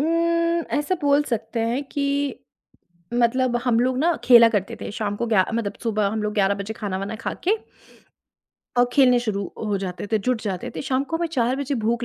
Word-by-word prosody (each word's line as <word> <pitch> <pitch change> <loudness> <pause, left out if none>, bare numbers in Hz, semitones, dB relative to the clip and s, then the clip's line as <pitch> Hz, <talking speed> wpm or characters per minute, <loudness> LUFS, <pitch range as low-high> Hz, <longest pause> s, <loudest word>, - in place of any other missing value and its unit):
उम, 335 +1 +1
ऐसा 295 +5 0
बोल 285 0 +4
सकते 230 -2 -3
हैं 235 +5 0
कि 285 -2 -1 1.1
मतलब 245 +1 +2
हम 235 -2 +3
लोग 255 +1 +1
ना 335 +4 +2
खेला 235 -2 +8
करते 205 -4 -2
थे - - -5
शाम 205 -2 -2
को 235 - -2
ग्या 215 -5 +3
मतलब 225 -3 -1
सुबह 215 -3 0
हम 220 -1 -2
लोग 210 - -1
11 200 -1 +2
बजे 200 +2 -5
खाना-वाना 200 0 -4
खा - - -1
के 420 +4 +4 1.2
और 245 0 +4
खेलने 250 -2 +5
शुरू 215 -4 -2 0.2
हो 205 -2 0
जाते 185 0 -5
थे, 220 - +4
जुट 245 +2 -1
जाते 190 -4 -4
थे, - - -3
शाम 270 -1 0
को 325 +3 -2
हमें 340 +1 -1
4 250 -3 +1
बजे 280 0 -2
भूख 230 +2 0
235 Hz, 200 wpm, -23 LUFS, 210-275 Hz, 1.2 s, खेला